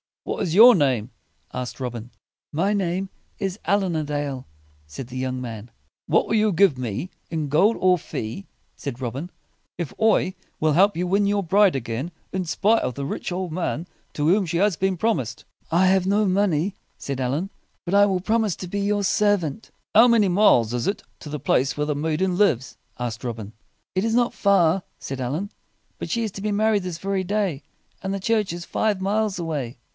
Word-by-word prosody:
"What - - -3
is 165 -1 -1
your 240 +4 +10
name?" 130 - +1 0.4
asked 125 +1 -5
Robin. 120 -2 -5 0.4
"My 190 +7 +1
name 190 -1 -1 0.3
is 195 +1 -3
Allin 190 -1 +1
a 155 - 0
Dale," 145 - -3 0.4
said 115 - -7
the 130 0 -7
young 130 0 -2
man. 115 -2 -7 0.4
"What - - +3
will 220 - +1
you 215 -1 +3
give 175 -5 +4
me, 125 - -4 0.2
in 155 -3 -2
gold 190 +10 +4
or 185 -1 +4
fee," 115 - -6 0.3
said 135 -2 -6
Robin, 130 +8 -4 0.5
"if 170 -5 -4
I 215 -4 +3 0.3
will 155 -1 +2
help 195 +6 +4
you 180 - 0
win 200 +3 +2
your 200 0 +1
bride 195 0 +4
again 125 +5 -3 0.2
in 185 -1 -2
spite 205 +7 +2
of 125 - -2
the 140 - -4
rich 150 - -4
old 180 -1 -3
man 170 0 -2 0.3
to 150 0 0
whom 190 +3 +4
she 170 0 -2
has 200 0 +3
been 190 +3 0
promised?" 135 - -1 0.3
"I 180 +3 +4
have 190 0 +3
no 205 +2 +3
money," 190 -2 +1 0.2
said 140 -2 -4
Allin, 140 +9 -1 0.4
"but 175 - -3
I 200 0 +7
will 190 -2 0
promise 215 -2 +1
to 180 - -6
be 200 +3 -3
your 205 0 0
servant." 205 -3 +1 0.2
"How 230 +3 +8
many 225 -5 +4
miles 175 - +4
is 120 -1 -1
it 200 - -2 0.2
to 150 - -9
the 150 0 -4
place 135 0 +1
where 150 - 0
the 150 - 0
maiden 160 +5 0
lives?" 135 - +1 0.2
asked 120 -1 -4
Robin. 110 -4 -5 0.4
"It 185 - 0
is 225 0 +1
not 240 0 +2
far," 190 -3 +3 0.2
said 135 -1 -6
Allin. 150 - -3 0.5
"But - - -5
she 235 -1 0
is 220 - -2
to 195 - -7
be 210 +1 -1
married 210 -1 +2
this 180 -3 -4
very 195 +1 -1
day, 190 -6 -1 0.4
and 190 0 -3
the 195 - -2
church 215 -1 +1
is 175 0 -6
five 215 -3 0
miles 210 0 0
away." 150 -9 -3
180 Hz, 200 wpm, -23 LUFS, 140-200 Hz, 0.5 s, your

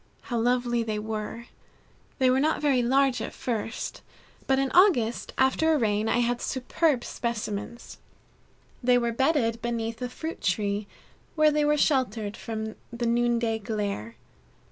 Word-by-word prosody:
How 235 - +1
lovely 240 0 +1
they 220 -2 -2
were! 220 +2 -5 0.7
They 260 -2 +4
were 260 - +3
not 310 +3 +1
very 280 -4 +2
large 265 +1 +2
at - - -5
first, 225 -2 -4 0.5
but 265 - +3
in 270 0 0
August 290 - +3
after 290 +5 +3
a - - +3
rain, 215 -3 +1
I 240 - +2
had 240 0 0
superb 260 +1 0
specimens. 235 -1 -5 0.8
They 250 0 +4
were 235 -1 0
bedded 235 -3 +1
beneath 230 -1 -3
a 250 - -2
fruit 320 +6 -6
tree, 200 +1 0 0.5
where 310 -1 +5
they 300 0 +2
were 300 0 +3
sheltered 230 -8 +1
from 220 -1 -5
the 240 0 -3
noonday 235 -1 +1
glare. 200 - -3
240 Hz, 145 wpm, -27 LUFS, 220-265 Hz, 0.8 s, where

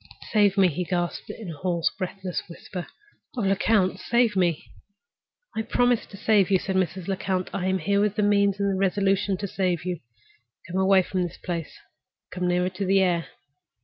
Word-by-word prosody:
"Save 205 -2 +4
me!" 190 -1 +6
he 180 +2 -2
gasped, 175 -1 -2
in 210 -7 -7
a 155 - -9
hoarse, 170 0 0
breathless 185 -1 -4
whisper. 175 +1 -7 0.5
"Oh, - - 0
Lecount, 195 -1 +2
save 235 0 +2
me!" 175 -4 +1 0.9
"I 220 - 0
promise 245 +1 +1
to 200 - -11
save 200 -3 +3
you," 195 - +5
said 190 +1 -3
Mrs. 185 -1 0
Lecount; 190 -1 -2
"I 185 -1 -1
am 190 0 +2
here 200 +3 +1
with 210 -1 +1
the 210 - +1
means 200 -1 +3
and 200 0 +1
the 190 - -1
resolution 195 0 +1
to 200 - -4
save 180 -3 -1
you. 180 -3 -2 0.7
Come 185 +1 -3
away 190 0 +5
from 185 +1 -2
this 175 -1 -3
place—come 180 +1 -7
nearer 180 +1 +1
to 185 +2 -4
the 195 +1 +3
air." 175 -3 +1
190 Hz, 180 wpm, -25 LUFS, 180-200 Hz, 0.9 s, me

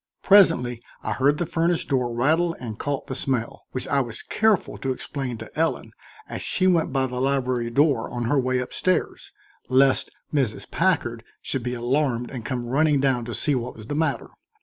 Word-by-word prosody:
Presently 165 - +5 0.2
I - - -2
heard 140 +3 +2
the 175 - -1
furnace 165 +1 0
door 125 -3 0
rattle 160 +8 +2
and 110 -4 -7
caught 145 -1 -2
the - - -5
smell, 125 -3 -2
which 130 - -4
I 140 0 +2
was 115 -3 -5
careful 220 -4 +1
to 135 - -1
explain 130 -2 -4
to 110 0 -11
Ellen 165 +1 -1 0.4
as - - -6
she 185 - 0
went 175 -3 +3
by 135 -1 +1
the 125 -1 -3
library 130 -3 0
door 140 -1 +2
on 120 -1 -3
her 135 +5 +2
way 130 0 +1
up 125 - -5
stairs, 185 0 -1 0.4
lest 135 +1 +4 0.2
Mrs. 130 -7 -1
Packard 145 -10 0 0.2
should 135 - -1
be 125 +1 -3
alarmed 125 0 0
and 125 -4 -6
come 125 -1 -3
running 145 +4 +2
down 130 -3 +1
to 120 -2 -4
see 145 +6 +1
what 125 -1 -3
was 110 - -10
the 130 - -4
matter. 160 +1 -1
130 Hz, 195 wpm, -24 LUFS, 120-150 Hz, 0.4 s, Presently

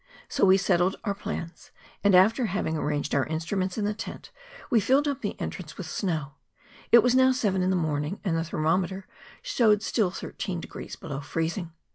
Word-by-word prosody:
So - - +2
we 190 0 +6
settled 185 -1 +2
our 200 -3 0
plans, 170 -4 -6 0.3
and 200 -2 +5
after 225 +6 +5
having 180 -4 -1
arranged 150 -1 -2
our 140 -2 +2
instruments 180 +5 -2
in 210 - 0
the 210 - 0
tent, 215 - -8 0.4
we 235 - +5
filled 270 +8 +3
up 280 -1 -2
the 205 - -4
entrance 165 -4 -6
with 185 - -6
snow; 160 -4 -2 0.6
it 235 -1 +8
was 245 0 +3
now 260 0 +5
seven 205 -7 0
in 185 - +1
the 190 - +2
morning, 155 +1 -1
and 180 -5 0
the 165 - 0
thermometer 180 +4 -1 0.4
showed 220 - +3
still 215 -6 +1
thir¬ 190 - -8
teen 180 -3 -3
degrees - - -8
below 140 -3 -6
freezing. 165 +4 -3
185 Hz, 190 wpm, -27 LUFS, 165-210 Hz, 0.6 s, it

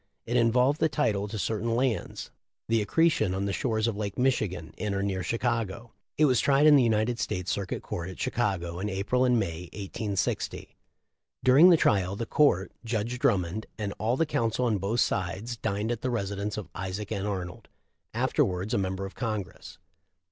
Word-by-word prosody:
It 120 - -2
involved 125 +5 +3
the 160 - +3
title 105 -10 0
to 110 +1 -5
certain 115 +2 -1
lands, 125 -2 -2 0.4
the 115 -1 +2
accretion 155 - +2
on 95 +1 -1
the 100 - -1
shores 110 -2 0
of 115 -3 0
Lake 100 -1 -4
Michigan, 110 -10 0
in 105 -2 -2
or 100 - -1
near 95 -2 -1
Chicago. 115 +2 -2 0.3
It 155 - +5
was 130 -4 +3
tried 140 +1 +4
in 150 -1 +8
the 140 - +6
United 115 0 +1
States 90 -4 -2
Circuit 100 -2 -3
Court 85 +1 -5
at 95 - -10
Chicago 90 -7 -1
in 105 +2 -2
April 105 +6 +1
and 125 -1 +3
May, 90 -4 -3
1860. 100 0 -3 0.7
During 140 +8 +7
the 170 - +7
trial, 100 -7 +2
the 115 - -3
Court 110 -9 +2
— - - -44
Judge 115 +1 -2
Drummond 105 -5 0
— - - -42
and 100 -2 -3
all 115 +4 +1
the 165 - +2
counsel 115 -3 0
on 110 -4 +1
both 105 +6 0
sides 95 +6 -1
dined 105 +2 -2
at 120 - -3
the 130 - -1
residence 100 -3 -2
of 105 -5 -5
Isaac 95 +3 -5
N. 100 -1 -2
Arnold, 90 -3 -5 0.4
afterwards 95 +5 0
a 120 - +2
member 95 0 -2
of 95 - -8
Congress. 105 -6 -5
105 Hz, 190 wpm, -28 LUFS, 95-120 Hz, 0.7 s, in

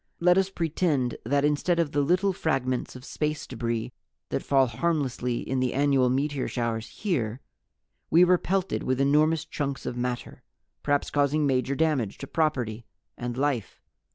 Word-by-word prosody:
"Let 180 +1 +5
us 190 0 +2
pretend 160 -7 0
that 140 +4 +2
instead 150 +4 +1
of 165 -4 +1
the 145 - +1
little 180 +6 +2
fragments 130 -8 -1
of 125 +1 -10
space 150 0 -2
debris 115 -2 -3 0.4
that - - -1
fall 135 -1 +3
harmlessly 125 -2 -1
in 130 0 0
the 130 -1 0
annual 135 -2 +3
meteor 140 +1 0
showers 115 -2 -2
here, 125 - -2 0.7
we 170 +3 +6
were 180 0 +4
pelted 190 0 -1
with 130 0 -1
enormous 150 +3 +3
chunks 140 -2 -4
of 120 - -3
matter, 125 0 -4 0.4
perhaps 145 -1 0
causing 145 +1 +2
major 130 0 +1
damage 140 -9 0
to - - -7
property 125 -8 -1 0.3
and 120 0 -5
life. 135 -6 -1
140 Hz, 155 wpm, -27 LUFS, 125-155 Hz, 0.7 s, we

